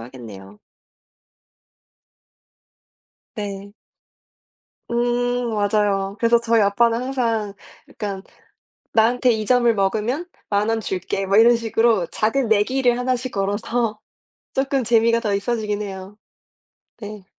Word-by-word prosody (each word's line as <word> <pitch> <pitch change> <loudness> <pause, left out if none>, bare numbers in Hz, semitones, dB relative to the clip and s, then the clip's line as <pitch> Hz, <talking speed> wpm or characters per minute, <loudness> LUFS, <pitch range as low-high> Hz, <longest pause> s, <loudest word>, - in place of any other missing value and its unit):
하겠네요. 110 -5 -11 2.8
네. 200 -1 -6 1.2
음. 245 0 0
맞아요. 205 -1 0
그래서 235 +1 +4
저희 230 -1 +2
아빠는 230 +4 +2
항상 230 -6 -1 0.4
약간 195 -2 -5 0.7
"나한테 240 +2 +3
2 220 -1 -2
점을 240 0 +3
먹으면 220 - -1 0.2
10,000 205 +1 +1
원 225 0 0
줄게." 195 -1 -3
뭐 195 +1 +2
이런 235 +2 +6
식으로 225 -4 +1
작은 230 +3 0
내기를 240 +4 +2
하나씩 255 0 -2
걸어서 210 +3 -1 0.6
쪼끔 270 -1 0
재미가 230 0 +3
더 210 -4 -1
있어지긴 210 0 -2
해요. 195 0 -8 0.8
네. 210 -3 -9
220 Hz, 215 characters per minute, -21 LUFS, 200-240 Hz, 2.8 s, 이런